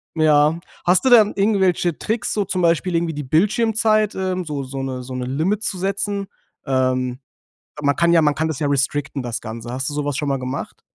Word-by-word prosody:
Ja. 155 +1 +3 0.3
Hast 180 +6 +4
du - - +5
denn 220 -4 +6
irgendwelche 190 -5 +1
Tricks, 220 0 -2
so 205 -2 0
zum 185 -1 -2
Beispiel 170 +1 +2
irgendwie 165 -2 0
die 150 - -4
Bildschirmzeit? 215 - +2
Ähm, 185 -1 -2
so 145 -3 -4
so 135 +1 -5
'ne 130 -1 -4
so 130 +1 -7
'ne 125 -1 -3
Limit 170 - -1
zu 190 - -3
setzen? 200 +1 -2 0.4
Ähm. 130 -1 0 0.6
Man 140 -1 +2
kann 170 0 +3
ja 165 - +5
man 150 -1 +2
kann 160 +1 0
das 155 -4 -4
ja 145 - 0
restricten, 140 -1 -1
das 120 -1 -4
Ganze. 115 +2 -7
Hast 130 +3 -3
du - - -6
sowas 145 -2 -2
schon 145 -2 -1
mal 135 -1 0
gemacht? 130 +2 -5
155 Hz, 210 wpm, -21 LUFS, 135-190 Hz, 0.6 s, denn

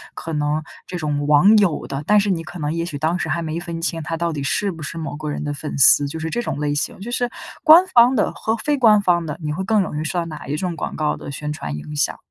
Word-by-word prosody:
可 165 - -6
能 150 +1 -1 0.2
这 180 - -5
种 145 -3 -2
网 150 +9 +6
友 185 -6 +1
的， 135 +2 -5
但 210 0 +5
是 200 -1 +1
你 165 -2 -2
可 175 +2 -9
能 150 -1 -2
也 170 - -2
许 160 -4 -5
当 160 +5 0
时 160 - -3
还 170 +2 -1
没 160 +1 -3
分 170 -2 -6
清 165 -1 -1
他 165 +2 -4
到 170 0 -1
底 145 - -4
是 195 +8 0
不 165 -3 -10
是 155 +3 -6
某 155 -3 -5
个 150 0 -5
人 - - -4
的 145 -1 -3
粉 150 0 -6
丝， 140 +1 +6
就 160 +3 -6
是 160 0 -4
这 240 - -1
种 235 - -4
类 145 -1 -1
型， 145 - -2
就 235 - -6
是 245 0 0 0.3
官 325 +3 +8
方 250 -6 +5
的 210 - +1
和 220 - -1
非 295 +5 0
官 215 -4 +6
方 175 -2 +2
的， 150 +1 -5
你 150 0 -2
会 190 - -3
更 215 +1 +2
容 150 -4 -4
易 155 - -2
受 175 +3 -3
到 170 - 0
哪 155 -3 -8
一 145 +2 -2
种 180 0 -3
广 150 - -5
告 155 -1 0
的 - - -9
宣 150 +2 -4
传 75 - -5
影 150 - -8
响？ 145 - 0
165 Hz, 315 characters per minute, -21 LUFS, 150-185 Hz, 0.3 s, 官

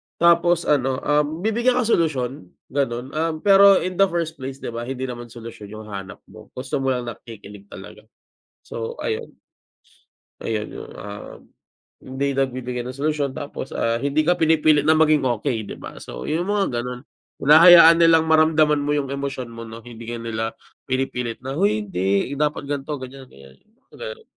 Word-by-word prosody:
tapos 170 0 +3
ano, 135 -3 0
um, 150 +4 0
bibigyan 235 +3 +2
ka 250 - +2
solusyon 140 - 0 0.2
gano'n, 130 -2 -2
um, 160 +2 -1
pero 200 -1 +6
in 185 +1 -4
the 195 - +6
first 165 -3 -3
place 130 0 -6
'di - - -4
ba? 120 +1 -6
Hindi 130 0 -4
naman 120 -2 -6
solusyon 115 -3 -10
yung 110 0 -10
hanap 95 -1 -8
mo, - - -14
gusto 130 +2 -3
mo 135 -1 0
lang 125 - -3
nakikinig 105 -3 -12
talaga, - - -12 0.6
so 465 +1 -6
ayun. 465 -1 -4 1.1
Ayun 110 -1 -3
yung, - - -9
um, 100 0 -9 0.6
hindi 140 +2 -2
nagbibigay 125 -2 -2
ng 130 +1 -7
solusyon 145 -2 -1
tapos, 140 -2 -6
ah, 115 0 0
hindi 140 +3 +1
ka 175 +2 +3
pinipilit 155 -2 +3
na 160 - +6
maging 155 -2 +4
okey 120 -2 -1
'di - - -7
ba? - - -10
So - - -8
yung 175 +5 -2
mga 195 -13 0
gano'n, 125 0 -6 0.4
hinahayaan 165 +2 +8
nilang 165 -1 +5
maramdaman 155 -1 +4
mo 145 +1 0
yung 140 -2 -2
emosyon 135 -3 -5
mo 115 0 -8
'no, 115 +1 -10
hindi 115 -1 -11
ka 120 0 -4
nila 115 -1 -4 0.3
pinipilit 125 -3 -2
na, 135 +1 -4
"huy 105 +1 +1
hindi, 100 +6 -1
dapat 150 -1 -1
ganito 145 +1 -3
ganyan, 130 +1 -10
ganyan" 70 - -16
yung 220 - -37
mga - - -19 0.2
gano'n. 455 -2 -21
135 Hz, 175 wpm, -22 LUFS, 120-160 Hz, 1.1 s, hinahayaan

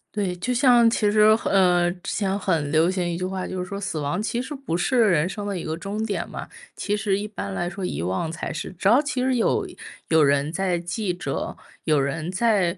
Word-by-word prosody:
对， 195 -4 -1
就 250 +8 -2
像 240 -2 +5
其 210 -3 +2
实 215 0 +3 0.2
呃， 180 -3 +4
之 - - -3
前 195 -1 0
很 165 -8 0
流 160 +2 +4
行 185 -1 -1
一 170 - -3
句 185 - -2
话， 185 0 -3
就 185 - -5
是 180 - -2
说 200 +2 -6
死 195 -5 -3
亡 145 +7 -1
其 235 +2 -2
实 260 +4 -4
不 270 - -3
是 175 +9 0
人 175 -8 +4
生 205 +2 -5
的 200 - -2
一 170 - -5
个 160 -1 -3
终 205 +5 -4
点 205 -3 -3
嘛。 - - -7 0.3
其 205 - -1
实 210 -2 0
一 205 +1 -4
般 200 -1 -6
来 175 -2 -2
说 190 +2 -6
遗 180 - -3
忘 95 - -1
才 165 - -5
是。 160 - -5
只 190 - 0
要 240 +7 +6
其 265 -4 -2
实 260 -1 +2
有 225 - +1 0.4
有 160 -2 +5
人 140 +2 +2
在 185 0 0
记 180 +3 -2
着， 175 - -4 0.3
有 155 -3 +3
人 155 +5 -2
在 190 -3 +2
190 Hz, 255 characters per minute, -24 LUFS, 170-210 Hz, 0.4 s, 要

